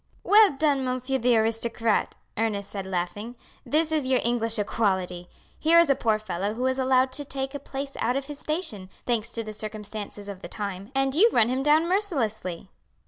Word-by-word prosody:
"Well 420 -4 +6
done, 280 -1 +1
monsieur 255 +1 -1
the 240 0 +3
aristocrat!" 225 0 0 0.2
Ernest 210 -3 -2
said 195 -2 -5
laughing. 190 +6 -3 0.3
"This 315 +1 +1
is 305 -4 0
your 260 -1 +3
English 230 -1 0
equality! 190 -4 -1 0.3
Here 330 +2 +5
is 335 -4 +5
a - - +4
poor 220 -4 +1
fellow 210 0 -3
who 250 +2 -2
is 260 0 0
allowed 260 0 +3
to 290 +3 -4
take 270 0 -4
a 285 - -4
place 275 0 -6
our 245 +3 0
of 275 - -3
his 290 0 -8
station, 265 - -3 0.2
thanks 235 -2 0
to 230 - -2
the 215 -1 -7
circumstances 210 -1 -6
of 195 -2 -7
the - - -7
time, 200 +1 -5
and 270 0 +1
you 405 +10 +6
run 230 0 +4
him 260 +1 0
down 305 +4 +4
mercilessly!" 225 - -1
240 Hz, 195 wpm, -26 LUFS, 210-275 Hz, 0.3 s, Well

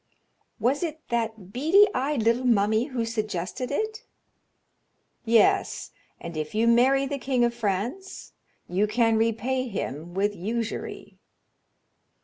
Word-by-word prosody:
"Was 265 +4 +1
it 320 -3 -3
that 220 -5 -3
bead 330 +11 +5
eyed 270 -2 0
little 230 +3 +2
mummy 220 0 +3
who 255 -5 -3
suggested 215 0 -3
it?" 435 +9 -3 1.2
"Yes, 225 -1 +2 0.3
and 170 -1 -8
if 155 +4 -4
you 225 +2 +2
marry 260 +4 +4
the 280 0 -3
king 255 -2 +1
of 235 - 0
France 235 - -4 0.3
you 195 +4 +1
can 225 +1 +2
repay 230 +4 0
him 175 - -5
with 205 +1 0
usury." 225 +5 -5
230 Hz, 125 wpm, -26 LUFS, 210-260 Hz, 1.2 s, bead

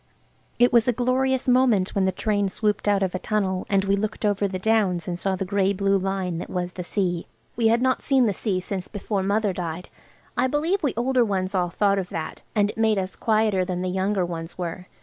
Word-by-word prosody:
It 245 +1 +4
was 235 -1 +5
a 245 - +3
glorious 255 +2 +1
moment 245 -7 +3
when 195 -1 +1
the 190 - +2
train 205 +1 0
swooped 210 +2 -1
out 200 -1 +3
of 185 - -1
a 185 - -2
tunnel 190 -3 -1
and 195 -1 +2
we 195 0 +2
looked 215 +1 -3
over 205 -1 +1
the 190 -1 -4
downs 190 -4 +1
and 175 -1 -3
saw 195 0 0
the 190 +1 -3
grey 195 +1 +1
blue 200 0 +1
line 190 -3 -1
that - - -7
was 180 0 -3
the 180 - -5
sea. 175 -2 -2 0.3
We 230 -1 +2
had 230 +2 +3
not 260 0 +2
seen 265 -3 +3
the 210 - +1
sea 190 -1 -1
since 185 0 -5
before 205 -1 -3
Mother 200 +1 +1
died. 175 -1 -5 0.5
I 255 - +2
believe 320 +8 0
we 285 -7 0
older 250 +1 +2
ones 195 -3 -1
all 180 -2 +1
thought 200 +2 +2
of 185 - -4
that, 160 -1 -5
and 205 -1 +2
it - - -11
made 220 -2 +3
us 190 0 -2
quieter 215 -4 +2
than 180 -1 -3
the 185 - -1
younger 190 0 0
ones 165 -1 -6
were. 180 +1 -5
200 Hz, 230 wpm, -24 LUFS, 185-220 Hz, 0.5 s, was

